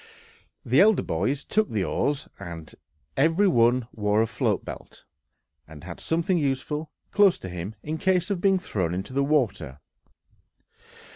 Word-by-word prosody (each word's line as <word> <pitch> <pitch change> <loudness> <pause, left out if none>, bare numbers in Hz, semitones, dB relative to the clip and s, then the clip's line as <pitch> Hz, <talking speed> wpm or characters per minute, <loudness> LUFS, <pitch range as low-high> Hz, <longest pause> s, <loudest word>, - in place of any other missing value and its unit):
The 130 +4 +4
elder 215 0 +5
boys 105 - -1
took 215 0 +1
the 105 -3 -1
oars; 135 - -1 0.9
every 165 +8 +3
one 120 -5 +3
wore 105 +1 +1
a - - +1
float - - -1
belt, - - -10 0.6
and 75 0 -12
had 85 -1 -8
something 170 +2 0
useful 150 +2 -2 0.2
close 205 -3 +5
to - - -8
him 90 +4 -6
in 155 +1 -4
case 185 -1 +1
of 185 -3 -1
being 195 -1 +4
thrown 90 - -2
into 95 +7 -5
the 140 +1 +1
water. 115 - 0
135 Hz, 145 wpm, -25 LUFS, 100-170 Hz, 0.9 s, elder